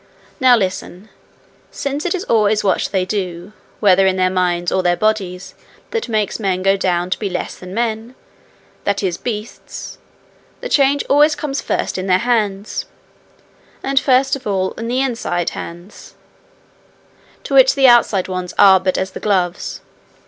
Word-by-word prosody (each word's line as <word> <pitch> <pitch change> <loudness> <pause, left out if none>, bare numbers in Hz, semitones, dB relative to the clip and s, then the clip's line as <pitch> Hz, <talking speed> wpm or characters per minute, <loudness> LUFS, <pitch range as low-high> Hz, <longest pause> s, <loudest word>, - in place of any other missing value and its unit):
'Now 255 -2 +6
listen. 190 0 -4 0.6
Since 285 +4 -3
it 360 - 0
is 370 - -4
always 215 - +2
what 195 - +1
they 190 -2 0
do, 185 -1 -4 0.3
whether 195 -2 +4
in 190 - +2
their 185 0 +1
minds 175 -2 0
or 190 - +1
their 175 -1 +1
bodies, 195 -4 -1 0.4
that 455 - -3
makes 215 -1 -1
men 185 -3 -1
go 195 0 +4
down 180 -2 -1
to - - -1
be 205 - -2
less 180 -1 -4
than 180 0 -11
men, 230 +1 -2 0.7
that 200 0 -1
is, 180 -3 -1
beasts, 220 -2 -7 0.6
the - - -6
change 280 - +3
always 295 +2 +4
comes 290 -2 -3
first - - -2
in 185 - -4
their 180 -1 +4
hands 210 -3 -1 1.0
and 270 0 +2
first 270 0 +2
of 265 -4 -8
all 190 -2 0
in 230 - -6
the 250 +2 0
inside 230 -9 -2
hands, 175 +4 -10 1.3
to - - -6
which - - +6
the 270 -1 +5
outside 235 -6 +4
ones 185 -1 -5
are 190 -1 +7
but 185 0 -1
as 190 0 -2
the - - -8
gloves. 185 -3 -1
200 Hz, 165 wpm, -18 LUFS, 185-245 Hz, 1.3 s, are